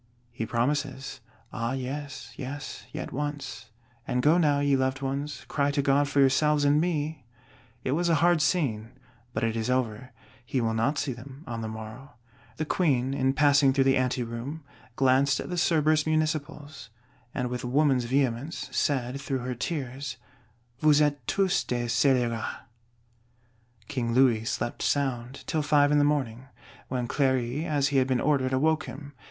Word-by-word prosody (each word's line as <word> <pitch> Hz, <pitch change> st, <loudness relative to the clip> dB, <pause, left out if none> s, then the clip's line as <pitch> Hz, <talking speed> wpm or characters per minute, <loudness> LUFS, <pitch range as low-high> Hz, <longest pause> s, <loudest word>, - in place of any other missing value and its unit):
He 115 Hz, -2 st, -4 dB
promises: 135 Hz, +3 st, -1 dB, 0.3 s
Ah 115 Hz, +3 st, -2 dB
yes, 140 Hz, +2 st, -5 dB
yes; 145 Hz, +2 st, -7 dB
yet -, -, -5 dB
once; 135 Hz, -6 st, -5 dB, 0.4 s
and 125 Hz, 0 st, 0 dB
go 160 Hz, +4 st, +5 dB
now, 145 Hz, -4 st, +3 dB
ye 145 Hz, -1 st, +3 dB
loved 130 Hz, +1 st, -1 dB
ones; 140 Hz, +2 st, -3 dB
cry 140 Hz, -1 st, +1 dB
to 140 Hz, 0 st, 0 dB
God 140 Hz, +1 st, +3 dB
for 140 Hz, 0 st, 0 dB
yourselves 145 Hz, +2 st, +4 dB
and 145 Hz, +2 st, +4 dB
me! 155 Hz, -4 st, -2 dB, 0.6 s
It 130 Hz, -, -1 dB
was 170 Hz, +4 st, +1 dB
a 165 Hz, -, +4 dB
hard 170 Hz, +1 st, +3 dB
scene, 130 Hz, -9 st, 0 dB, 0.4 s
but 110 Hz, -1 st, -3 dB
it 115 Hz, 0 st, 0 dB
is 115 Hz, +1 st, -2 dB
over. 125 Hz, -1 st, -1 dB, 0.3 s
He 130 Hz, +2 st, -2 dB
will 115 Hz, -2 st, 0 dB
not 115 Hz, +7 st, +1 dB
see 145 Hz, -3 st, -1 dB
them 135 Hz, +4 st, -11 dB
on 115 Hz, -4 st, -5 dB
the 110 Hz, -, -3 dB
morrow. 110 Hz, +6 st, -8 dB, 0.4 s
The 155 Hz, -, -2 dB
Queen, 135 Hz, -6 st, +1 dB
in 135 Hz, -1 st, +1 dB
passing 140 Hz, -2 st, +4 dB
through 135 Hz, 0 st, +3 dB
the 135 Hz, 0 st, +3 dB
ante 130 Hz, -1 st, 0 dB
room, 120 Hz, +7 st, -6 dB, 0.3 s
glanced 135 Hz, +2 st, +3 dB
at -, -, -5 dB
the -, -, -1 dB
Cerberus 155 Hz, -3 st, +2 dB
Municipals; 155 Hz, -3 st, -2 dB, 0.4 s
and 125 Hz, -1 st, -3 dB
with 125 Hz, -, -4 dB
woman's 130 Hz, 0 st, +2 dB
vehemence, 130 Hz, +3 st, -1 dB
said 135 Hz, -1 st, 0 dB
through 135 Hz, -3 st, -3 dB
her 125 Hz, -, -2 dB
tears, 130 Hz, 0 st, -4 dB, 0.6 s
"Vous 150 Hz, 0 st, +5 dB
êtes 145 Hz, -1 st, +3 dB
tous 195 Hz, -2 st, +2 dB
des 120 Hz, -1 st, -1 dB
scélérats". 120 Hz, -2 st, +1 dB, 1.3 s
King 120 Hz, -4 st, -2 dB
Louis 120 Hz, -4 st, +4 dB
slept 120 Hz, -, -3 dB
sound, 130 Hz, -3 st, -1 dB
till 155 Hz, -, 0 dB
five 145 Hz, -1 st, +3 dB
in 150 Hz, -, +4 dB
the -, -, +4 dB
morning, 130 Hz, -4 st, -1 dB, 0.4 s
when 125 Hz, -2 st, -2 dB
Cléry, 130 Hz, +2 st, 0 dB
as 145 Hz, -2 st, +1 dB
he 140 Hz, -, +1 dB
had 130 Hz, -1 st, +3 dB
been 130 Hz, -2 st, +1 dB
ordered, 135 Hz, -3 st, +1 dB
awoke 155 Hz, +4 st, +2 dB
him. 145 Hz, -1 st, -9 dB
135 Hz, 165 wpm, -27 LUFS, 125-145 Hz, 1.3 s, go